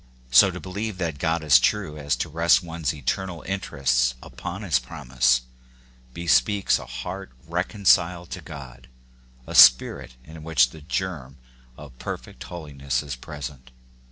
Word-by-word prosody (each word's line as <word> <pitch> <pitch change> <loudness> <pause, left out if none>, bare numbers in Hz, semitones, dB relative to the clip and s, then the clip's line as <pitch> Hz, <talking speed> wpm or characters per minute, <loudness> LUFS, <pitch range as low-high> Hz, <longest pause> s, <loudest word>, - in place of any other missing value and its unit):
So 65 - +7
to - - -6
believe 100 +2 -5
that 80 -6 -3
God 80 +1 0
is 70 -5 +6
true 95 +2 0
as 70 -1 -1
to - - -3
rest 85 +3 +3
one's 80 -4 -3
eternal 85 +5 -3
interests 65 -10 0
upon - - -7
his 65 - +2
promise, 65 -2 0 0.7
bespeaks 90 +6 +2
a - - -10
heart - - -7
reconciled 90 0 +1
to - - -6
God, 65 -3 -11 0.6
a - - -8
spirit 60 0 +6
in 80 +2 -12
which 70 -6 +3
the 80 - -12
germ 75 -5 -4 0.4
of 70 -4 -13
perfect 60 - -7
holiness 70 -3 -4
is 70 -4 -5
present. 65 -1 -9
75 Hz, 140 wpm, -24 LUFS, 65-85 Hz, 0.7 s, So